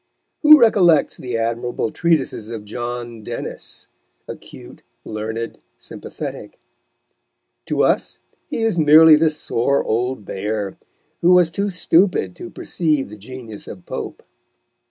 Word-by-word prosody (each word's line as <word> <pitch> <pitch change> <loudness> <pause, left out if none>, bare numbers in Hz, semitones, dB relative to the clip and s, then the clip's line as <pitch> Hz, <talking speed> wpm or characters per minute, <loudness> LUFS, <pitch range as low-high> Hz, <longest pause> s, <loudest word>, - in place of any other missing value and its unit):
Who 305 0 +9
recollects 185 - +4
the 125 -2 -4
admirable 115 0 -2
treatises 155 -10 0
of 110 -3 -7
John 120 +1 -6
Dennis, 115 +2 -7 0.4
acute, - - -11 0.2
learned, 110 +2 -5 0.2
sympathetic? - - -8 1.1
To - - +1
us - - 0 0.3
he 225 - -2
is 220 -6 +1
merely 155 +1 +8
the 160 +1 +3
sore 140 -2 0
old 120 0 -2
bear, 105 0 -4 0.5
who 175 +2 +5
was 180 -2 +4
too 200 +4 -2
stupid 175 - +1
to 175 - -8
perceive 155 - -1
the 105 - -10
genius 110 0 -10
of 90 -3 -10
Pope. - - -6
125 Hz, 120 wpm, -20 LUFS, 110-165 Hz, 1.1 s, Who